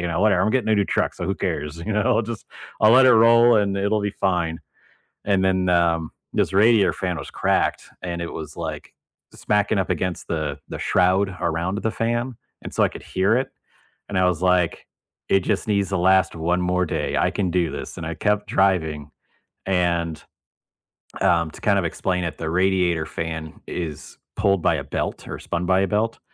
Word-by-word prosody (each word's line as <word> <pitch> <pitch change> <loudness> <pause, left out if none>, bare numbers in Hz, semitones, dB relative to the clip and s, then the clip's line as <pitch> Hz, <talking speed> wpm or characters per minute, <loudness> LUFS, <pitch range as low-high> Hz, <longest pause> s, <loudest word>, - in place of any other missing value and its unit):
"you 85 - -2
know, 85 +2 -1
whatever, 100 -4 +3
I'm 105 - +2
getting 110 -3 0
a - - +5
new 100 -1 +2
truck, - - -1
so - - -5
who 95 - 0
cares, 80 -3 -3
you 110 - -1
know, 105 - +1
I'll 115 - +2
just 115 0 -7 0.3
I'll 110 - +6
let 130 +1 +7
it 125 - +7
roll 115 +1 +6
and 100 -1 0
it'll 100 +2 +1
be 105 0 -1
fine," 85 -5 -1 0.7
and 100 -2 +2
then, 95 -1 +1
um, 85 -2 +2 0.2
this - - 0
radiator 105 -2 +5
fan 90 -1 -3
was - - -8
cracked, - - 0 0.2
and 85 -1 -4
it 85 - -4
was 80 -2 -8
like, 80 -3 -6 0.4
smacking 105 0 0
up 95 - -1
against 90 +1 -3
the 80 -4 -2
the - - -6
shroud 95 +1 +2
around 85 +3 -1
the 110 - -1
fan, 120 +3 -2 0.3
and - - -8
so - - 0
I - - +4
could - - -11
hear 95 +4 +1
it, 130 - -2 0.6
and 100 - -1
I 90 - +4
was 90 -1 0
like, 90 -2 +1 0.4
"It 95 - +4
just 100 +2 -2
needs 100 -2 +1
to 95 - 0
last 95 0 +3
one 85 +2 0
more 90 0 0
day, - - -2
I - - +2
can 95 -3 -1
do 85 -2 +1
this," - - -7
and 80 - -6
I 80 - -3
kept 105 +4 0
driving, 80 -6 +1 0.6
and, 85 -4 0 1.0
um, 85 -2 +2
to - - -14
kind - - +2
of - - -2
explain 90 -1 -1
it, 85 - -4
the 80 - -4
radiator 90 -2 +1
fan 80 -1 -6
is 80 -4 -6 0.2
pulled 100 -2 +2
by 80 - +2
a 70 - -3
belt 70 - -4
or - - -6
spun 85 +1 -3
by 95 +1 +3
a 95 - +1
belt. 110 +3 -1
90 Hz, 205 wpm, -22 LUFS, 85-100 Hz, 1.0 s, let